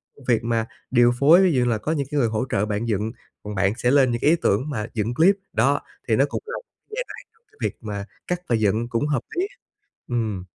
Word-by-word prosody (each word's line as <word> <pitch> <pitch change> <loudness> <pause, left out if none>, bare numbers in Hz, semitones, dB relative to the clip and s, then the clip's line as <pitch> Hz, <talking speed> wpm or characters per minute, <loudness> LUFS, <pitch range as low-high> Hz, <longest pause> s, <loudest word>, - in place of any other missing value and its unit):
công 140 - -17
việc 115 -3 +2
mà 115 -1 0 0.3
điều 120 -1 +5
phối 160 +6 +7
ví 185 - +4
dụ 130 - +2
như 125 - +2
là 115 - +1
có 110 +9 -3
những 140 -4 -1
cái 150 - -1
người 120 - +3
hỗ 110 +3 -1
trợ 105 0 +1
bạn 105 +2 -2
dựng, 110 +1 -1 0.3
còn 105 0 -6
bạn 100 +1 +2
sẽ 125 0 +2
lên 135 -3 +5
những 120 - -2
cái - - +4
ý 165 - +6
tưởng 125 +10 +1
mà 110 -6 -2
dựng 110 +1 -1
clip, 180 +9 +5 0.2
đó, - - +2 0.3
thì - - +3
nó - - +4
cũng - - -3
là 470 - -5 0.3
giai 470 +3 -3
đoạn - - -9 0.4
việc - - -1
mà 100 -3 -5 0.2
cắt 180 0 -1
và 120 - +3
dựng 110 +2 +1
cũng 120 +5 0
hợp 140 -5 0
lý. 370 +3 0 0.6
Ừm. 110 -6 -1
120 Hz, 250 wpm, -23 LUFS, 110-145 Hz, 0.6 s, phối